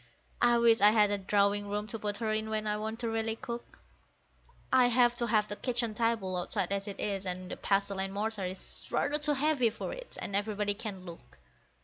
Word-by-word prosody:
I 240 0 +5
wish 230 -2 +4
I 205 - +9
had 210 -1 +4
a 205 - 0
drawing 200 +1 +1
room 205 +1 -2
to 225 - -5
put 205 -1 -2
her 220 0 -1
in 215 0 -2
when 215 0 -2
I 210 0 0
want 220 +2 -4
to 235 - -1
really 225 0 -1
cook; 235 +1 -7 1.0
I 250 -1 +6
have 240 0 +4
to 235 - 0
have 210 -1 +2
the 205 - -3
kitchen 240 -1 -1
table 220 -4 0
outside 180 +1 -1
as 200 +1 -1
it 200 - -7
is, 195 -2 -1
and 185 0 -4
the - - -5
pestle 200 0 0
and 195 0 -1
mortar 205 0 -2
is 185 +1 -7
rather 295 +1 0
too 295 0 +3
heavy 275 -4 +2
for 220 - -6
it, - - -8
and 200 - -4
everybody 205 0 0
can 200 -3 -7
look. 165 - -12
210 Hz, 220 wpm, -31 LUFS, 200-230 Hz, 1.0 s, I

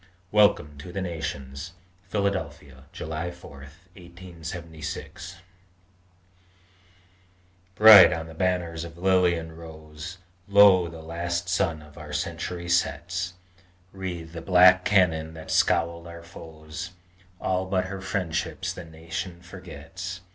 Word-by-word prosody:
WELCOME 100 -9 +3
TO 90 +5 -9
THE 95 +2 -3
NATIONS 80 -2 -5 0.4
PHILADELPHIA, 75 -10 -3
JULY 80 +2 -4
4, 85 0 -12 0.4
1876 85 -1 -8 2.4
Bright 105 -2 +10
on 80 -2 -3
the 80 - -11
banners 85 -1 -1
of 85 0 -10
lily 90 -1 +3
and 80 -1 -7
rose 80 +2 -9 0.3
Lo! 100 -3 +7
the 80 -1 -10
last 85 +1 -3
sun 80 -4 0
of 75 +2 -15
our 75 -1 -9
century 85 +2 -3
sets! 90 +1 0 0.6
Wreathe 90 -4 -6
the 85 0 -7
black 90 +1 +6
cannon 80 -5 +2
that 80 -1 -8
scowled 85 +1 +1
on - - -9
our 85 0 -11
foes, 80 +1 -9 0.5
All 95 0 -1
but 95 -1 0
her 95 +1 -6
friendships 85 -3 -2
the 90 - -8
nation 85 +2 -6
forgets! 90 +1 -8
85 Hz, 120 wpm, -26 LUFS, 80-90 Hz, 2.4 s, Bright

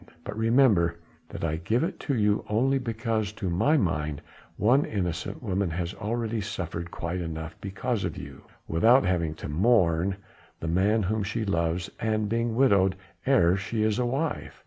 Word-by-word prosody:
But - - -6
remember 110 -7 +3 0.3
that - - -7
I 80 -1 0
give 110 - 0
it 165 - -4
you 105 -6 +2
only 130 +6 +2
because 115 -3 -2
to 95 -4 -3
my 145 - +3
mind 75 - -1 0.3
one 125 +7 +4
innocent 90 +1 -3
woman 100 -3 0
has 85 +2 -3
already 115 +1 -2
suffered 85 -4 -4
quite 85 +2 -4
enough 80 -1 -5
because 100 +3 -2
of - - -3
you, - - -10 0.2
without 115 +9 +4
having 85 -3 0
to - - -7
mourn 90 0 +2 0.4
the 80 - -5
man 100 +6 +2
whom 110 +3 0
she 105 +3 -2
loves 85 -2 -1
and 110 -1 0
being 115 +1 -1
widowed 100 -7 +4 0.3
ere 90 -10 +5
she 110 +3 -2
is 110 +2 +1
a 125 - +1
wife. 140 +6 -3
100 Hz, 165 wpm, -27 LUFS, 85-115 Hz, 0.4 s, ere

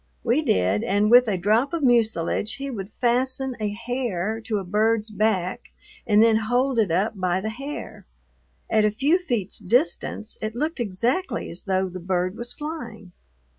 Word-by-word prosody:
We 245 +5 +2
did, 95 - +1
and 205 +2 +2
with 245 0 +7
a 200 -3 0
drop 220 - +1
of 330 -3 -2
mucilage 220 -4 +1
he 275 0 -5
would 195 -5 -6
fasten 255 +2 +1
a 210 -1 -1
hair 225 -2 -3
to 220 -2 -1
a 195 - -3
bird's 215 +3 +1
back 200 -4 -1 0.4
and 210 0 +5
then 225 -1 +5
hold 245 +3 +1
it 210 -4 +2
up 195 +7 +1
by 185 0 +1
the 215 +3 -3
hair. 275 +6 -8 0.6
At 220 -1 +2
a 210 - +4
few 275 - +2
feet's 235 - -1
distance 220 - 0
it 215 +1 -4
looked 305 +4 -2
exactly 240 - -1
as 170 - -7
though 190 -1 +1
the 185 0 -7
bird 180 +1 -1
was 240 +1 -4
flying. 240 - -7
220 Hz, 170 wpm, -24 LUFS, 195-245 Hz, 0.6 s, with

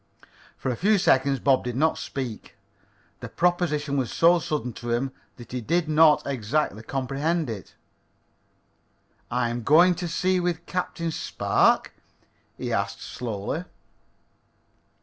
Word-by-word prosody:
For 130 - -2
a - - -2
few 210 - +3
seconds 140 -7 +3
Bob 135 -2 +3
did 125 -1 -4
not 155 +4 +2
speak. 125 -6 -6 0.6
The - - -7
proposition 155 -5 0
was 130 -4 -1
so 170 +1 +4
sudden 150 -6 -3
to 120 +2 -7
him 120 +3 0 0.2
that 120 -2 -13
he 125 0 -3
did 165 +7 0
not 155 -1 +5
exactly 130 -3 -1
comprehend 135 +5 -2
it. 100 -5 -9 1.5
"I'm 120 -1 -1
to - - -5
go 170 +8 +6
to 175 +1 -4
sea 185 +3 +1
with 175 -2 -2
Captain 170 -2 -3
Spark?" - - +1 0.6
he - - -3
asked - - -2
slowly. 120 - -4
145 Hz, 130 wpm, -25 LUFS, 125-170 Hz, 1.5 s, go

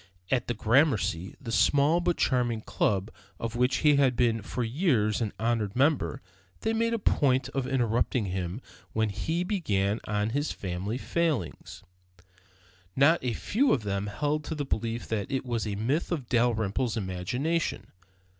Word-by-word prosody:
At 125 -2 +1
the 120 - -1
Gramercy, 110 - +2
the 125 -5 -6
small 145 +7 +4
but 175 -1 0
charming 120 -4 +1
club 100 -1 0 0.3
of 115 0 -4
which 125 +2 +2
he 145 -1 +6
had 135 -3 +3
been 115 -2 +2
for 125 +4 -3
years 115 - +1
an 110 -3 -1
honored 115 -3 0
member, 130 - +1 0.4
they 220 - 0
made 230 +1 +1
a - - 0
point 130 - +2
of 135 -1 -2
interrupting 120 -2 +1
him 95 +3 -3 0.3
when 110 -1 +1
he 160 - -2
began 110 - 0
on 105 +1 -1
his 145 +4 -1
family 95 +5 -4
failing. 145 - -1 1.4
Not 145 +4 +4
a 125 -2 0
few 255 - +1
of 125 - 0
them 100 0 -2
held 150 +8 -1
to 160 - -4
the 145 -2 -3
belief 115 -1 -2
that 105 -3 -2
it 135 -1 -1
was 115 -3 -2
a 100 - -2
myth 130 - -1
of 145 -8 -2
Dalrymple's 120 -1 +1
imagination. 125 - -2
120 Hz, 160 wpm, -28 LUFS, 105-145 Hz, 1.4 s, he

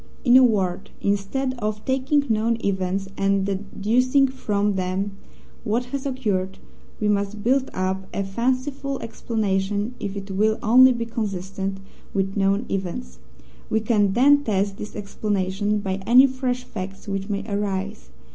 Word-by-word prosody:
In 245 -1 +6
a 260 - +9
word, 195 -6 +1
instead 205 +7 -1
of 215 -1 -3
taking 270 +2 +1
known 225 0 +1
events 190 0 -1
and 195 0 +2
deducing 220 +7 +2
from 210 -6 -1
them 190 +1 -1 0.5
what 235 +2 0
has 280 0 -2
occurred, 200 -8 -1 0.4
we 210 - 0
must 205 0 0
build 265 +2 +2
up 190 +1 -2
a 200 - -2
fanciful 260 +6 -1
explanation 210 -1 -1
if 200 -1 -4
it 195 0 -6
will 215 +3 +2
only 255 +4 +7
be 235 -2 -2
consistent 195 -3 -3 0.4
with 195 0 0
known 200 +2 +2
events. 170 - -4 0.5
We 220 - +2
can 210 -3 +2
then 285 +5 +5
test 200 -3 0
this 210 - -7
explanation 205 0 -1
by 195 -1 -3
any 250 +3 +8
fresh 255 -1 -2
facts 195 -3 -7
which 195 0 -3
may 200 0 -2
arise. 200 - -3
205 Hz, 145 wpm, -23 LUFS, 195-240 Hz, 0.5 s, a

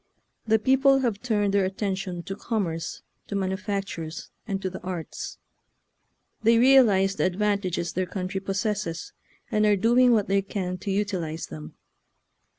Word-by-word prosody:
The 220 0 +5
people 270 +4 +4
have 230 -6 -1
turned 205 -5 +1
their 200 -1 +3
attention 190 -2 -3
to 195 +2 -5
commerce, 190 -8 -3 0.2
to 200 - -4
manufactures, 190 -4 -3 0.2
and 195 -3 -1
to 190 - -3
the 185 0 -6
arts. 180 -3 -6 1.0
They 230 +1 +5
realize 225 -7 +5
the - - +2
advantages 185 -3 0
their 185 0 -1
country 190 +1 -3
pos 195 0 -2
sesses, 210 -6 -3 0.4
and 215 - +2
are 210 -1 +5
doing 240 +5 +4
what 215 -4 +3
they 195 0 +2
can 185 -2 -4
to 200 - -5
utilize 185 -5 -2
them. 75 0 -9
195 Hz, 150 wpm, -26 LUFS, 185-215 Hz, 1.0 s, The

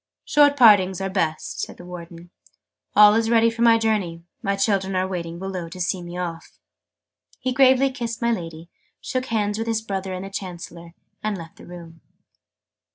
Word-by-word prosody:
"Short 290 -1 +4
partings 200 -7 +6
are 195 0 -3
best," 160 -5 -2
said - - -5
the 175 - -12
Warden. 175 -1 -10 0.6
"All 210 0 +8
is 225 +1 +1
ready 230 0 +4
for 230 0 -6
my 230 -1 +6
journey. 205 -7 -1 0.2
My 200 0 0
children 195 -1 0
are 185 0 +1
waiting 170 -3 -5
below 185 -2 -5
to 180 - -10
see 180 +1 -1
me 175 0 -8
off" 170 -2 -6 0.8
He 255 - -2
gravely 265 0 +4
kissed 235 -3 -5
my 235 0 +1
Lady, 165 -5 -5 0.3
shook 255 0 -3
hands 210 -1 -1
with 225 - -3
his 225 -1 -1
brother 195 -3 -4
and 185 +1 -6
the 195 - -9
Chancellor, 170 -3 -8 0.3
and 215 -2 -1
left 165 -2 -11
the - - -14
room. 170 -2 -12
195 Hz, 180 wpm, -23 LUFS, 175-225 Hz, 0.8 s, All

